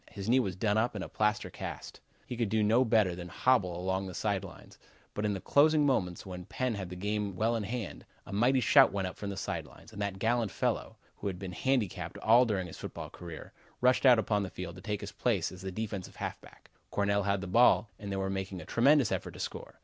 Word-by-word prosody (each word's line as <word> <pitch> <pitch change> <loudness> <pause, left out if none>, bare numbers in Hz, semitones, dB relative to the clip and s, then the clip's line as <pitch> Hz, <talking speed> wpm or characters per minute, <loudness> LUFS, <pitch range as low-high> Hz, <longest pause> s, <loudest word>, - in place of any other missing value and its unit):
His 100 -3 -7
knee 125 +3 +5
was 95 -7 -1
done 105 +2 +1
up 115 0 0
in 100 - -3
a - - -6
plaster 105 0 0
cast. - - -7 0.3
He 125 - -5
could 115 -3 -1
do 110 +1 +2
nothing 115 +4 +4
better 110 -5 +4
than 85 0 -7
hobble 90 -3 +1
along 95 +1 -1
the 95 - -7
side 100 -3 -1
lines, 90 -4 -12 0.3
but 105 - -2
in 105 - +1
the - - -4
closing 150 +6 +4
moments 90 -11 0
when 90 -2 -7
Penn' 130 +4 -2
had 95 -4 -5
the 90 - -7
game 105 +1 -2
well 110 +5 +1
in 115 - -1
hand, 110 +1 -5 0.2
a 95 - -8
mighty 125 +6 +3
shout - - +6
went 100 -1 -1
up - - -7
from 100 - -5
the 100 - -5
side - - -3
lines, - - -16
as 100 - -8
that 100 -2 -2
gallant 115 +2 +1
fellow, - - -2 0.2
who 100 - -4
had 95 -2 -3
been 95 -1 -6
handicapped 125 -1 -1
all 120 +3 +5
during 100 -5 -1
his 90 - -10
football - - -7
career, 85 -3 -9 0.3
rushed 125 +2 +4
out 125 -2 +8
upon 105 -1 +1
the 95 - -3
field 90 -2 -6
to - - -10
take 105 0 -3
his - - -6
place - - 0
as 90 - -10
the 95 0 -4
defensive 100 -2 -5
halfback. - - -8 0.2
Cornell 100 0 +1
had 100 0 0
the 100 - -5
ball, 115 +4 +5
and 100 -1 -6
they - - -1
were 95 0 -1
making 95 -1 -3
a 80 - -9
tremendous 135 0 +4
effort - - -3
to - - -10
score. - - -6
100 Hz, 245 wpm, -31 LUFS, 95-115 Hz, 0.3 s, out